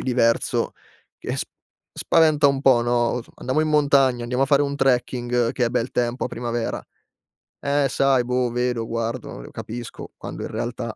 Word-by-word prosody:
diverso 120 Hz, -2 st, +1 dB, 0.5 s
che -, -, -4 dB
s -, -, 0 dB, 0.5 s
spaventa 155 Hz, -3 st, +3 dB
un 140 Hz, -1 st, +1 dB
po', 130 Hz, -4 st, +5 dB
no, 120 Hz, 0 st, -1 dB, 0.2 s
os: 125 Hz, -, -4 dB
"Andiamo 130 Hz, +4 st, -1 dB
in 155 Hz, -, +1 dB
montagna, 140 Hz, -5 st, +3 dB
andiamo 125 Hz, +3 st, +1 dB
a -, -, -5 dB
fare 140 Hz, +1 st, +4 dB
un 140 Hz, 0 st, -1 dB
trekking, 125 Hz, -3 st, +1 dB
che 125 Hz, -, +1 dB
è -, -, +1 dB
bel 125 Hz, 0 st, -1 dB
tempo 120 Hz, +1 st, -1 dB
a -, -, -2 dB
primavera"; 120 Hz, 0 st, -3 dB, 0.8 s
"Eh, 140 Hz, 0 st, +1 dB
sai 135 Hz, -2 st, +3 dB
boh, 125 Hz, 0 st, 0 dB
vedo, 120 Hz, -1 st, -1 dB
guardo, 115 Hz, 0 st, -3 dB
uhm, -, -, -10 dB
capisco", 120 Hz, +1 st, -8 dB
quando -, -, -8 dB
in -, -, -4 dB
realtà, 115 Hz, -1 st, -4 dB
125 Hz, 175 wpm, -23 LUFS, 120-140 Hz, 0.8 s, po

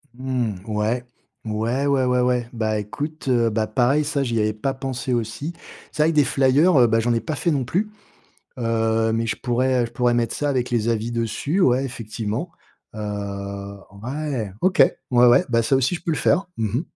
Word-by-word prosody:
Mmh. 125 Hz, -5 st, -2 dB
Ouais. 110 Hz, +3 st, -1 dB, 0.4 s
Ouais, 115 Hz, +6 st, -1 dB
ouais, 135 Hz, -2 st, +2 dB
ouais, 125 Hz, 0 st, +2 dB
ouais. 125 Hz, -1 st, +1 dB
Bah, 110 Hz, -2 st, -1 dB
écoute, 145 Hz, +9 st, -6 dB
heu, 120 Hz, -2 st, +3 dB
bah, 110 Hz, 0 st, -1 dB
pareil, 130 Hz, +7 st, +2 dB
ça, 145 Hz, -1 st, -1 dB
j'y 115 Hz, -3 st, -1 dB
avais 110 Hz, 0 st, +1 dB
pas 135 Hz, +5 st, -2 dB
pensé 130 Hz, -2 st, -3 dB
aussi. 120 Hz, +8 st, -3 dB, 0.4 s
C'est 150 Hz, -, +1 dB
vrai 165 Hz, -, +3 dB
que -, -, -5 dB
des 150 Hz, -2 st, +5 dB
flyers, 140 Hz, +7 st, +3 dB
heu, 120 Hz, -2 st, +6 dB
bah, 115 Hz, 0 st, +2 dB
j'en 120 Hz, +1 st, +1 dB
ai 115 Hz, -, 0 dB
pas 155 Hz, -2 st, -3 dB
fait 170 Hz, -, 0 dB
non 140 Hz, -4 st, 0 dB
plus, 190 Hz, -, -1 dB, 0.7 s
heu, 115 Hz, -1 st, +1 dB
mais 115 Hz, 0 st, 0 dB
je 110 Hz, -, -1 dB
pourrais, 125 Hz, 0 st, +1 dB
heu, 120 Hz, -, 0 dB
je -, -, -11 dB
pourrais 120 Hz, 0 st, +2 dB
mettre 120 Hz, -1 st, 0 dB
ça 145 Hz, -, -1 dB
avec 130 Hz, -3 st, 0 dB
les 115 Hz, -2 st, 0 dB
avis 115 Hz, 0 st, 0 dB
dessus. 120 Hz, -, -1 dB
Ouais, 130 Hz, -4 st, +3 dB
effectivement. 115 Hz, +4 st, -4 dB, 0.4 s
Heu, 100 Hz, -1 st, -5 dB, 0.2 s
ouais! 130 Hz, -5 st, -3 dB
OK. 185 Hz, 0 st, +1 dB, 0.3 s
Ouais, 125 Hz, 0 st, +5 dB
ouais, 120 Hz, -, +6 dB
bah, 115 Hz, -1 st, +2 dB
ça 135 Hz, -, +1 dB
aussi 130 Hz, +6 st, +1 dB
je -, -, -13 dB
peux 165 Hz, -, -1 dB
le -, -, -1 dB
faire. 190 Hz, -, +2 dB
Mmh 110 Hz, +1 st, 0 dB
mh. -, -, -2 dB
120 Hz, 210 wpm, -22 LUFS, 110-135 Hz, 0.7 s, heu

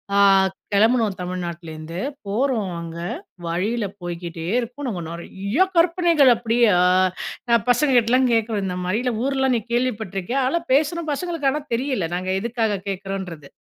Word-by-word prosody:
ஆ -, -, +4 dB, 0.5 s
கெளம்புனோம் 220 Hz, -1 st, +3 dB
தமிழ்நாட்டுலேருந்து 170 Hz, -2 st, -6 dB, 0.3 s
போறோம் 220 Hz, -2 st, 0 dB
அங்க, 165 Hz, 0 st, -7 dB, 0.5 s
வழியில 205 Hz, +7 st, -1 dB, 0.2 s
போய்க்கிட்டே 170 Hz, -1 st, -6 dB
இருக்கோம் 250 Hz, +4 st, -5 dB
நாங்க 190 Hz, -8 st, -3 dB
நிறையா 195 Hz, -, -1 dB
கற்பனைகள் 335 Hz, -5 st, +4 dB
அப்படியே 235 Hz, 0 st, +2 dB, 1.0 s
பசங்க 265 Hz, +3 st, +2 dB
கிட்டலாம் 250 Hz, +2 st, +3 dB
கேட்குறோம் 220 Hz, -3 st, 0 dB
"இந்த 180 Hz, -1 st, -3 dB
மாரி 210 Hz, +6 st, 0 dB
இல்ல 250 Hz, -2 st, 0 dB
ஊர்லாம் 265 Hz, -2 st, +1 dB
நீ 230 Hz, -, 0 dB
கேள்விப்பட்டிருக்கியா?" 230 Hz, -1 st, -1 dB
அதெல்லாம் 335 Hz, +5 st, -1 dB
பேசுறோம் 315 Hz, +2 st, +1 dB
பசங்களுக்கு 330 Hz, -3 st, -1 dB
ஆனா 300 Hz, +2 st, -2 dB
தெரியல 250 Hz, -8 st, -1 dB
நாங்க 185 Hz, +1 st, -2 dB
எதுக்காக 225 Hz, -4 st, -1 dB
கேட்குறோம்ன்றது 190 Hz, -6 st, -5 dB
225 Hz, 130 wpm, -22 LUFS, 185-265 Hz, 1.0 s, ஆ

